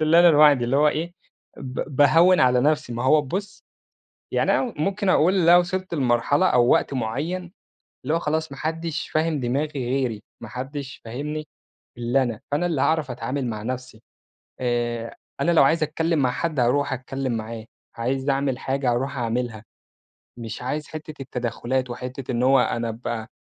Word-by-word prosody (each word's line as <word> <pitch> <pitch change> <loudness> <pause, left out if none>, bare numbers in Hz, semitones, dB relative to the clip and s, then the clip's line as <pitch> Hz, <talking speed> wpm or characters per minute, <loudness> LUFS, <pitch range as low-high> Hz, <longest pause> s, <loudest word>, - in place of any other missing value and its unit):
اللي 155 +2 +5
أنا 175 - +7
لوحدي 145 -5 +6
اللي 130 +3 +1
هو 150 +1 +5
إيه، 165 +3 -2 0.4
ب 130 +1 -6
باهوِّن 165 +6 +5
على 125 -1 +4
نفْسي، 150 -2 +1
ما 120 +2 -3
هو 150 +3 +5
بُصّ، 190 +9 -5 0.7
يعني - - +2
أنا 245 - 0
ممكن 195 +5 0
أقول 180 +1 +4
اللي 170 -2 +4
أنا 175 - +9
وصَلت 185 0 -3
لمرحلة 135 +4 +2
أو 120 -1 +4
وقت - - +3
مُعيّن، 160 +10 -3 0.5
اللي 150 - 0
هو 165 - +2
خلاص 160 -1 -2
ما 135 - -9
حدّش 165 +1 -3
فاهم 155 -2 0
دماغي 135 +2 -2
غيري، 125 -4 -1 0.2
ما - - -8
حدّش 135 +2 -6
فاهمني 150 +6 -5 0.5
إلا 120 +3 +1
أنا، 115 -4 -3
فأنا 155 +5 +1
اللي 160 -6 0
هاعرَف 155 -4 +1
أتعامل 130 +2 -3
مع 110 -2 -4
نفْسي 125 -2 -6 0.6
آآ، 120 -1 -2 0.2
أنا 170 - +2
لو 165 - +6
عايز 160 +3 +3
أتكلّم 160 +1 0
مع 130 -3 +2
حد 150 +1 -2
هارُوح 140 +4 +2
أتكلّم 130 0 -3
معاه، 110 0 -6 0.3
عايز 130 +4 -1
أعمل 135 -2 0
حاجة 135 -1 -1
هارُوح 130 +3 -1
أعملها، 115 -2 -2 0.7
مش 115 -2 -7
عايز 150 +5 -3
حِتّة 155 -2 -8
التدخُّلات 125 0 -2
وحِتّة 125 +2 -6
إن 120 +1 0
هو 135 0 +5
أنا 115 -1 0
أبقى 115 0 -5
135 Hz, 170 wpm, -23 LUFS, 125-155 Hz, 0.7 s, أنا